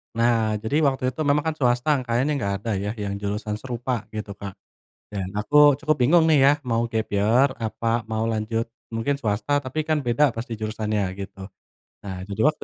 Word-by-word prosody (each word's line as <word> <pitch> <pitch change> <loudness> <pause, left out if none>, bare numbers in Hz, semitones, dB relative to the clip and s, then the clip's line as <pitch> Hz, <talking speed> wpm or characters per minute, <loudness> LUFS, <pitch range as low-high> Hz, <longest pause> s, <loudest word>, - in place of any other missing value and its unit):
Nah, 115 -2 +2
jadi 115 +7 0
waktu 130 -2 +1
itu 130 +5 -6
memang 145 +1 +3
kan, 160 +1 -2
swasta 125 +3 +2
kayaknya 125 +5 +1
enggak 100 -6 -1
ada 115 +1 -3
ya, 105 +2 -2
yang 100 -3 -4
jurusan 105 +1 -3
serupa, 120 -1 -3
gitu 105 -2 -6
Kak. 100 -1 -7 0.6
Dan, 100 -3 -3
aku 145 +7 +5
cukup 155 +1 0
bingung 150 +7 +5
nih 150 - +5
ya, 140 - +7
mau 115 -2 0
gap 110 -1 -2
year, 110 +7 +3
apa, 115 0 -1
mau 110 0 -2
lanjut, 110 +1 -1 0.3
mungkin 140 +5 0
swasta, 110 +4 0
tapi 145 +2 -3
kan 155 0 0
beda 125 +4 +3
pasti 115 0 -5
jurusannya, 110 -1 -2 0.2
gitu. 95 0 -8 0.6
Nah, 95 -2 -5
jadi 100 +2 -2
waktu 155 0 +1
115 Hz, 185 wpm, -24 LUFS, 105-135 Hz, 0.6 s, ya